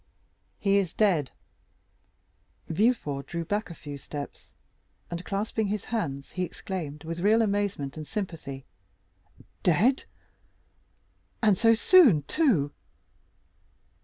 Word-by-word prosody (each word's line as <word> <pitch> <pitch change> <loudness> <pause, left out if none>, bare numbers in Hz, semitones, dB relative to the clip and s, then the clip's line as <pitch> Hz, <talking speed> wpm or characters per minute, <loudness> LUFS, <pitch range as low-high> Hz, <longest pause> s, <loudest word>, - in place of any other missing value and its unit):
"He 200 -1 +2
is 190 -4 -1
dead." 175 -10 +2 1.4
Villefort 160 - 0
drew 170 -1 -4
back 205 +3 -2
a 170 - -8
few 145 -2 -8
steps, 145 +1 -8 0.6
and, 170 +1 -4
clasping 210 +2 -1
his 205 +1 -3
hands, 140 -11 -2
exclaimed, 175 -4 -4
with 165 +1 -5
real 215 +5 +4
amazement 200 -9 -1
and 155 -1 -6
sympathy, 155 -8 -5 1.0
"Dead?—and 215 - -2
so 225 +4 +5
soon 230 - +6
too!" 190 - +2
180 Hz, 100 wpm, -27 LUFS, 150-215 Hz, 1.4 s, soon